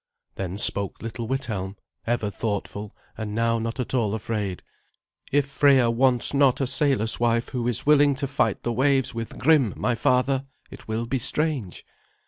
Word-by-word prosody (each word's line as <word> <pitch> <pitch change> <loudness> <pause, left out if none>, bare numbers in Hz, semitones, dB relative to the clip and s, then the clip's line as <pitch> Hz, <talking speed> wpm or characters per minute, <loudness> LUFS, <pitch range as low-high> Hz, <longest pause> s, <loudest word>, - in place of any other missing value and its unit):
Then 95 0 -5
spoke 100 -2 +3
little 115 0 -5
Withelm, 110 -7 -3 0.3
ever 115 -3 -1
thoughtful, 100 0 -4 0.2
and 105 -1 -4
now 115 0 +1
not 115 +2 -4
at 125 - -4
all 110 -5 0
afraid. 105 -4 -4 0.7
"If 145 0 +2
Freya 140 -3 +3
wants 125 +1 +3
not 140 -2 +3
a 135 - +1
sailor's 130 -5 +1
wife 115 0 +1
who 120 -2 -3
is 120 - 0
willing 145 -1 +4
to 140 +1 -2
fight 140 +1 -1
the 120 - -1
waves 135 +1 +1
with 115 -1 -6
Grim, 135 -4 +3
my 125 - 0
father, 130 +3 +1 0.2
it - - -13
will 110 +1 -2
be 130 +2 -2
strange." 130 - -2
120 Hz, 165 wpm, -24 LUFS, 110-135 Hz, 0.7 s, willing